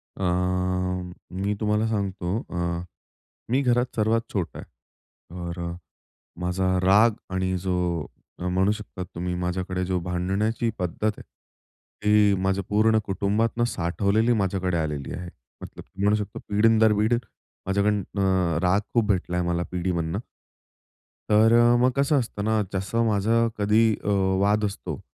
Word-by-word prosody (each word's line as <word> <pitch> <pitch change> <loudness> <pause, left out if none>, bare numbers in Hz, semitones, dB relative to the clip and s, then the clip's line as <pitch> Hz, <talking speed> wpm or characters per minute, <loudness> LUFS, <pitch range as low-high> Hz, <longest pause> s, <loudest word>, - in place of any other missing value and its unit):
अ, - - -5 1.1
मी 100 +3 -2
तुम्हाला 105 0 +1
सांगतो, 100 -3 -2
अ, 85 -1 -2 0.7
मी 130 +4 +2
घरात 125 -1 +1
सर्वात 110 +1 +2
छोटा 90 -5 -3
आहे. - - -9 0.7
तर, 85 0 -5 0.8
माझा 90 +1 0 0.2
राग 105 +5 +6 0.2
आणि 95 0 0
जो 95 +1 -3 0.7
म्हणू 95 +2 +1
शकता 105 -3 -6
तुम्ही 90 0 -5
माझ्याकडे 90 +1 -2
जो 90 0 0
भांडण्याची 95 +6 -1
पद्धत 90 +2 -4
आहे. - - -10 0.8
ती 105 -1 +5
माझं 95 +1 +1
पूर्ण 110 +1 +3
कुटुंबातून 105 +4 0
साठवलेली 100 +4 +1
माझ्याकडे 95 -4 0
आलेली 75 -4 -3
आहे. 90 -1 -6 0.3
मतलब - - -10 0.2
म्हणू 105 +1 +4
शकतो 105 -1 -4
पिढीन 110 +2 +4
दर 110 -1 +5
पिढी 110 +3 +3 0.5
माझ्याकडून 100 +2 +2
अ, 95 -4 0
राग 90 +3 +3
खूप 115 -3 +3
भेटलायं 90 -3 0
मला 85 0 0
पिढीमधनं. 90 0 -1 1.1
तर 110 +2 +5 0.3
मग 125 +1 +4
कसं 140 +1 +3
असतं 110 -4 -4
ना 110 0 +2
जसं 95 +5 0
माझं 110 +2 +2
कधी 105 +2 +3 0.2
अ, - - -6 0.3
वाद 105 +2 +2
असतो, 100 -1 -5
100 Hz, 130 wpm, -25 LUFS, 90-110 Hz, 1.1 s, राग